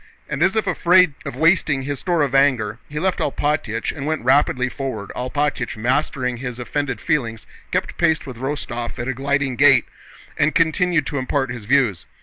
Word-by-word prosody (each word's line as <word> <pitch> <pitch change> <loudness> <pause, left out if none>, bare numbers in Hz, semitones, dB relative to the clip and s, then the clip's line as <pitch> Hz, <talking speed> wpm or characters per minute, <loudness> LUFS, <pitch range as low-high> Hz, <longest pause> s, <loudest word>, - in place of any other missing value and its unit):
And - - -4
as - - +3
if 220 - +1
afraid 180 -2 +4
of - - -5
wasting 160 -5 +2
his 140 0 -4
store 175 -4 +1
of 140 -2 -2
anger, 130 -6 +2
he 150 - -7
left 185 +2 0
Alpátych 145 -6 -1
and 145 -1 -5
went 155 -5 -1
rapidly 130 -1 +3
forward. 125 -6 -5
Alpátych, 130 -1 -2
mastering 125 +1 -1
his 125 -1 -5
offended 135 -1 -3
feelings, 115 -8 -1 0.3
kept - - -2
pace 160 - +2
with 130 -4 -8
Rostóv 130 -2 -4
at 120 - -4
a 130 - 0
gliding 140 0 -1
gait 135 -4 +6 0.5
and 155 +2 +2
continued 165 -1 +2
to 145 -2 -3
impart 135 0 -1
his 120 -4 -7
views. 120 -8 +1
135 Hz, 175 wpm, -21 LUFS, 125-150 Hz, 0.5 s, gait